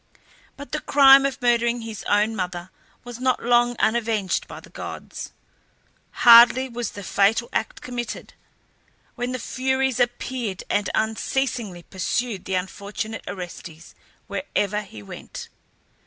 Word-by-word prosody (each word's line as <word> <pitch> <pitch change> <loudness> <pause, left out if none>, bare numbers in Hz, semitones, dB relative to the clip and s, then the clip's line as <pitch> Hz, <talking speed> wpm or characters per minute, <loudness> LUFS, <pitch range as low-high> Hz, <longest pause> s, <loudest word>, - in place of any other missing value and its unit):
But 285 +1 -10
the 305 - -1
crime 275 -1 +7
of 275 -1 -6
murdering 235 0 +2
his 225 -2 -7
own 210 +2 +2
mother 180 -2 -4 0.3
was 245 -1 -9
not 255 0 0
long 240 0 +3
unavenged 220 -4 0
by - - -9
the - - -16
gods. - - -7 0.9
Hardly 240 +2 +9
was 235 -2 -4
the 205 - -8
fatal 205 +5 +2
act 220 - -2
committed 240 -3 -6 0.8
when 245 0 -3
the 255 - -2
Furies 265 0 -1
appeared 240 -4 -2
and 205 -1 +1
unceasingly 220 -3 -2
pursued 200 +3 -3
the 190 - -2
unfortunate 200 +4 -4
Orestes 175 -3 -8 0.3
wherever 210 -7 -2
he 110 - -12
went. - - -9
230 Hz, 125 wpm, -23 LUFS, 200-245 Hz, 0.9 s, Hardly